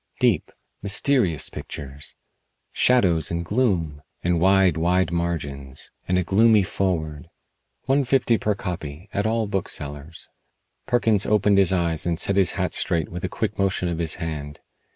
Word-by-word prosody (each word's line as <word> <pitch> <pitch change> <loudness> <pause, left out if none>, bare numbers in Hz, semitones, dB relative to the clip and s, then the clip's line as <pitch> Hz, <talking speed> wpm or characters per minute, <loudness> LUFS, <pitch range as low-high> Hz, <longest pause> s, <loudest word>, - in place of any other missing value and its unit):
Deep, - - +2 0.3
mysterious 100 - +1
pictures! 70 +1 -7 0.6
Shadows 90 -11 +3
and 85 0 -2
gloom! 85 - 0 0.2
And 85 -1 +1
wide, 95 -1 +4
wide 90 +2 +1
margins. 70 -6 -4 0.2
And 90 - +1
a 90 - +2
gloomy 105 +3 +4
foreword. 80 -6 -2 0.6
One 135 +2 +2
fifty 125 -3 +2
per 105 -1 0
copy, 90 -2 -6
at 100 +2 0
all 115 0 0
booksellers." 80 -6 -5 0.6
Perkins 115 -5 +2
opened 105 -1 +3
his 95 -2 +4
eyes 85 -3 0
and 85 -1 -1
set 100 - +2
his 95 -3 +3
hat - - -2
straight 80 -3 0
with 90 0 -7
a - - -1
quick - - -3
motion 95 -2 +1
of 85 -1 -3
his 80 -3 +1
hand. 75 -4 -6
90 Hz, 150 wpm, -23 LUFS, 80-100 Hz, 0.6 s, wide